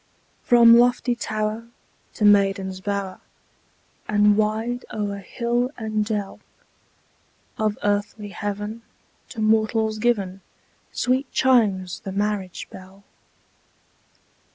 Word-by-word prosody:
From 235 -1 +7
lofty 245 0 +2
tower 215 0 -3 0.5
to 210 - 0
maiden's 195 -2 +3
bower, 200 -1 -3 0.9
And 210 0 +4
wide 220 +3 -1
o'er 205 -2 -3
hill 240 +5 -1
and 215 -2 -1
dell, 210 -2 -4 1.2
Of 215 -1 0
earthly 205 +1 -1
heaven, 210 +2 -5 0.5
to 230 - -9
mortals 220 0 +1
given, 200 -5 0 0.5
Sweet 255 +2 0
chimes 205 -9 +2
the 195 - -7
marriage 200 -2 -3
bell. 190 +1 -13
210 Hz, 95 wpm, -23 LUFS, 200-230 Hz, 1.2 s, From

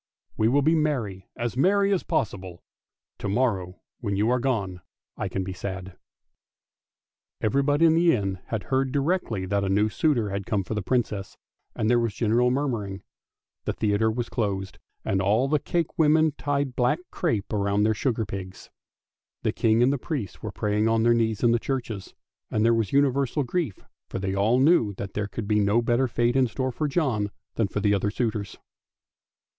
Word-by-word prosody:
We 110 - +2
will 140 +4 +3
be 160 +3 +4
mem", 130 - 0 0.2
as 120 0 -2
merry 200 +8 +3
as 185 - +1
possible; 95 -4 -3 0.6
to 100 - -3
morrow 100 -5 -1 0.2
when 100 -5 -2
you 105 +4 +2
are 125 - +2
gone 100 -8 -1 0.3
I - - -3
can 95 - -2
be 95 0 -5
sad! 95 -1 -6 0.8
" - - -34
Even 135 +6 +2
body 145 +3 +3
in 160 - +6
the 170 +1 +4
town 95 -4 -2
had 110 -3 -3
heard 130 -1 0
directly 140 - 0
that 100 +1 0
a 95 - -1
new 105 +3 +2
suitor 120 - +1
had 100 0 -4
come 100 -3 0
for 100 - -5
the 105 - -1
Princess, 105 -3 -2 0.4
and 110 - -1
there 120 +1 +4
was 115 -4 -1
general 120 +3 +2
mourning. 115 -8 -2 0.6
The - - -1
theatre 110 +1 +1
was 120 +2 -2
closed, 100 -4 -3 0.3
and 95 0 +1
all 110 +7 +2
the 150 +1 +2
cakewomen 160 -1 +2
tied 140 -3 -1
black 125 +4 +2
crape 105 -3 -1
round 100 0 +1
the 110 - +3
sugar 110 +1 -1
pigs. 95 -1 -8 0.7
The - - +2
King 115 +1 +3
and 135 +3 +3
the 140 - -2
priests 130 - -4
were - - -5
praying 105 +1 0
on 115 0 +2
their 120 0 +5
knees 110 -2 0
in 120 - +5
the 120 - +3
churches, 115 -7 -4 0.3
and 110 +1 +1
there 115 - +5
was 115 -3 0
universal 140 0 +2
grief, 140 - -2 0.3
for - - -4
they 95 0 -2
all 105 +5 +2
knew 135 -8 +4
that 100 0 -6
there 105 -1 -2
could 105 +1 -5
be 105 0 +2
no 105 +3 +3
better 120 +2 +2
fate 120 +1 +1
in 130 -1 +4
store 130 +2 -2
for 150 +5 -2
John 130 -10 0 0.2
than 110 - +1
for 105 - -3
the 105 0 +3
other 100 +1 +1
suitors. 110 -3 -3
115 Hz, 190 wpm, -26 LUFS, 100-135 Hz, 0.8 s, in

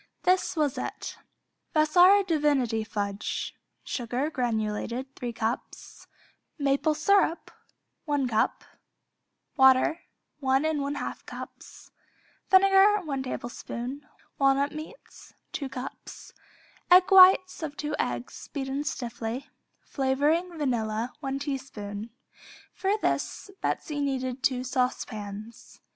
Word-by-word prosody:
This 370 0 +2
was 295 -4 +1
it. - - -5 0.6
Vassar 355 +6 +6
Divinity 290 - +1
Fudge 205 -1 -3 0.3
Sugar 250 +5 -2
(granulated), 235 +1 -2
3 245 -2 -4
cups 230 +1 -5 0.5
Maple 285 +2 +1
syrup, 340 +1 +2 0.5
1 290 -4 0
cup 220 -2 0 0.9
Water, 265 +5 +5 0.4
1 270 0 +2
1/2 290 -2 -2
cups - - -10 0.6
Vinegar, 390 +2 +6
1 280 -6 -3
tablespoon 255 +1 -6 0.3
Walnut 275 +1 +3
meats, 310 +11 -11 0.2
2 275 -2 -4
cups 260 0 -8 0.6
Whites 370 0 +7
of 295 -2 -5
2 300 0 -2
eggs 120 0 -3
(beaten 275 0 -3
stiffly) 240 -2 -4 0.3
Flavoring 300 +6 0
(vanilla), 235 -4 -1
1 270 -2 -3
teaspoon 235 -7 -5 0.6
For 395 +2 0
this 405 - -2
Betsey 295 -3 -2
needed 260 -2 -2
two 255 -1 +1
saucepans. 220 -4 -4
275 Hz, 95 wpm, -27 LUFS, 245-310 Hz, 0.9 s, Whites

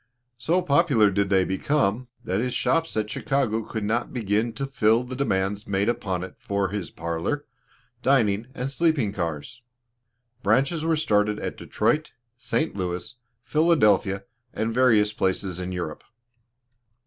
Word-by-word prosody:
So 175 +7 +1
popular 140 - +4
did 100 0 0
they 95 -2 +3
become, 120 +3 0 0.2
that 95 +2 -1
his 125 +1 -1
shops 165 -6 +1
at 105 -1 0
Chicago 135 -6 0
could 110 0 -5
not 115 +4 -1
begin 110 -1 0
to 135 +4 -3
fill 115 -3 +2
the 125 +1 -7
demands 100 -5 -1
made 100 +1 0
upon 95 -6 -2
it 95 - -8
for 100 -1 -1
his 100 -3 -4
parlor, 85 - -3 0.6
dining, 115 -5 +2
and 130 +2 -3
sleeping 145 -8 +1
cars. 85 - -4 0.8
Branches 135 - +2
were 165 0 +2
started 105 -8 +1
at - - -4
Detroit, 155 0 -1 0.2
St. 130 +5 -1
Louis, 90 +3 -3 0.3
Philadelphia, 105 - +3 0.3
and 110 +1 -1
various 110 -4 +4
places 95 -2 -1
in 90 0 -4
Europe. 85 -4 -5
110 Hz, 140 wpm, -25 LUFS, 95-135 Hz, 0.8 s, popular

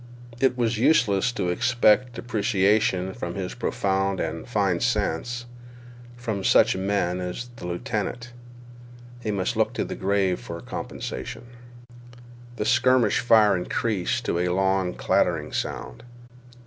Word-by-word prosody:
It 130 -2 +2
was 115 -2 0
useless 120 -6 +3
to 90 -7 -1
expect 120 +4 +2
appreciation 105 -4 +1
of 85 0 -3
his 95 -2 -4
profound 95 0 -1
and 80 0 -4
fine 100 -7 +1
sense 120 0 -1 0.7
from 110 -5 -3
such - - +4
men 95 -2 0
as 90 +7 -5
the 90 - -7
lieutenant. 110 +7 -4 0.9
He 110 - -4
must 100 -3 -1
look - - +1
to - - 0
the - - -5
grave 95 -1 0
for - - -7
comprehension. - - -6 1.1
The 105 - -3
skirmish 125 -2 +3
fire 110 -4 +5
increased 110 +5 -1
to 85 - 0
a 90 - +1
long 95 0 +1
clattering - - 0
sound. - - -4
100 Hz, 125 wpm, -25 LUFS, 95-120 Hz, 1.1 s, fire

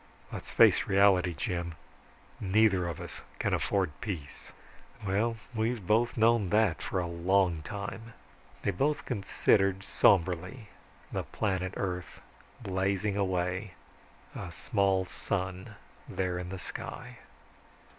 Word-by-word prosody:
Let's - - -6
face - - +5
reality, 95 -3 +4
Jim, 85 +3 -3 0.6
neither 95 -2 +3
of 85 - -4
us - - -8 0.2
can - - 0
afford 95 -5 +1
peace." 85 -10 -6 0.5
"Well, 110 +4 +1 0.2
we've 110 -2 -1
both 115 +5 +2
known 110 -3 +4
that 105 -3 +3
for 95 - -2
a 90 - -1
long 85 0 +2
time." 105 +6 -6 0.5
They 100 - +2
both 145 +11 0
considered 100 -3 +2
somberly, 95 +5 +2 0.4
the - - -1
planet 95 -3 -2
Earth 90 -2 -4 0.4
blazing 100 +1 0
away, 95 0 -1 0.6
a - - -6
small 95 -1 +1
sun 95 0 -4 0.3
there 90 -1 -1
in 90 0 -5
the 95 - -5
sky. - - -7
95 Hz, 115 wpm, -30 LUFS, 90-105 Hz, 0.6 s, face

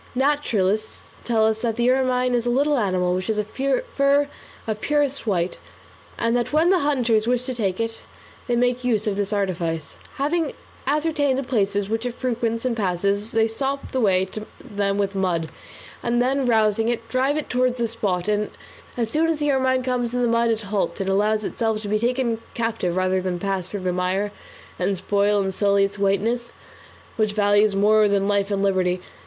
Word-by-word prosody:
Naturalists 225 -7 0 0.2
tell 225 -2 +2
us 220 0 +1
that 230 -1 -1
the 240 +1 +3
ermine 255 -1 +1
is 240 -1 0
a - - +2
little 285 +3 +2
animal 185 -4 +1
which 185 +1 -2
has 220 -1 0
a 210 - +1
fur 280 - +1 0.4
of 215 -1 -3
purest 285 -4 0
white, 180 -3 0 0.6
and 230 +1 +1
that 240 -1 0
when 320 +4 +3
the 375 - +4
hunters 245 -7 +1
wish 250 0 +1
to 260 - -2
take 200 -5 -1
it, 225 0 -3 0.5
they 240 - +1
make 245 +1 +1
use 225 -4 +1
of 210 -2 0
this 200 0 -2
artifice. 170 -6 -2 0.2
Having 305 +2 0 0.3
ascertained 290 -2 +1
the 275 - -1
places 205 -6 0
which 225 +3 -2
it 245 - -5
frequents 230 -2 -2
and 250 -2 0
passes, 200 +1 -1
they 225 0 +3
stop 270 +5 -3
the 260 - -1
way 190 -3 +3
to 215 +3 -8
them 200 -1 -2
with 200 -1 0
mud, 175 -4 -1 0.5
and 240 0 0
then 260 +1 +1
rousing 220 -1 +2
it, 230 -1 -2
drive 260 +5 +1
it 305 - -3
towards 250 0 +1
the 235 -1 0
spot, 205 -6 -2
and 210 0 0 0.5
as 235 -2 0
soon 320 +4 +2
as 325 -1 +1
the 295 -1 +1
ermine 260 -1 +1
comes 250 -2 -1
to 245 - -3
the 245 -1 +2
mud 230 0 +2
it 225 -1 0
halts, 205 0 -2
and 195 0 -1
allows 210 +2 +2
itself 220 0 -1
to 215 - -6
be 210 +1 +1
taken 235 -1 0
captive 225 -6 -1
rather 185 0 +1
than 180 -1 -2
pass 190 -1 -2
through 205 - -4
the 180 -1 -1
mire, 185 +3 0 0.5
and 190 +2 0
spoil 205 +2 +1
and 190 -1 -2
sully 200 0 +3
its 195 +1 -2
whiteness, 225 +5 0 0.7
which 215 -2 +1
it - - -13
values 205 0 +3
more 210 +2 +4
than 200 -1 +1
life 200 -1 +1
and 200 -1 0
liberty. 185 -2 +1
220 Hz, 200 wpm, -23 LUFS, 200-250 Hz, 0.7 s, the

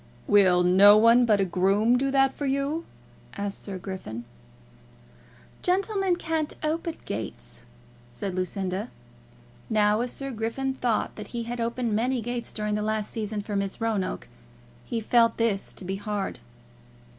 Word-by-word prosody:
"Will 185 -3 +5
no 195 +4 +7
one 230 +2 +6
but 210 -2 +4
a 195 - +3
groom 195 +6 +2
do 270 +2 +1
that 270 0 +3
for 290 - -3
you?" 280 +4 -1 0.5
asked 200 0 -3
Sir 195 -2 -6
Griffin. 180 - -7 1.4
"Gentlemen 385 0 +1
can't 320 -3 -2
open 325 +1 -1
gates," 110 +2 -6 0.5
said 190 +10 -4
Lucinda. 185 +3 -2 0.8
Now, 210 0 +3
as 245 0 -2
Sir 275 -1 -4
Griffin 235 +4 -2
thought 245 -4 -1
that 210 -1 -7
he 235 - -2
had 240 +1 -4
opened 235 -1 -1
many 245 +4 +1
gates 240 +1 -4
during 210 -1 -2
the 210 - 0
last 215 0 -1
season 215 -2 -3
for 205 0 -4
Miss 200 -1 -2
Roanoke, 220 -5 -2 0.6
he 230 - -2
felt 230 +1 +3
this 225 -4 0
to 190 - -9
be 190 +2 -3
hard. 205 -1 -3
220 Hz, 150 wpm, -26 LUFS, 200-250 Hz, 1.4 s, no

